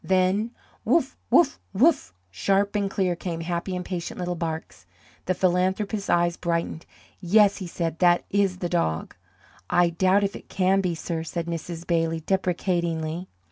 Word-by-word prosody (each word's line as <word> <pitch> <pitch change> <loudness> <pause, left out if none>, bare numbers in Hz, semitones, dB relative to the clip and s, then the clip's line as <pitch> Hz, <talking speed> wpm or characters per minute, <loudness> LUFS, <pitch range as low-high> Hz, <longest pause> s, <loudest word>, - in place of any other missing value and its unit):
Then: 190 +4 +2 0.3
"Woof! 315 -5 +2
woof! 310 -5 +4
woof!" 270 - +3 0.2
sharp 195 - +1
and 200 -1 +1
clear 185 -2 0
came 170 -1 -4
happy 175 +2 -3
impatient 180 -1 -4
little 180 -1 -2
barks. 160 - -5 0.4
The 185 - 0
philanthropist's 190 +3 0
eyes 175 0 +2
brightened. 170 -1 -2 0.3
"Yes," 200 +2 +4
he 185 - -6
said, 165 -1 -3
"that 175 -1 +4
is 195 -2 +2
the 180 - -2
dog." 170 - -1 0.5
"I 175 -1 +3
doubt 185 +4 +3
if 200 - -1
it - - -11
can 190 +1 +2
be, 180 -3 -1
sir," 165 0 -3
said 165 +1 -4
Mrs. 170 0 -5
Bailey, 165 -1 0
deprecatingly. 175 -3 -1
180 Hz, 150 wpm, -25 LUFS, 170-195 Hz, 0.5 s, woof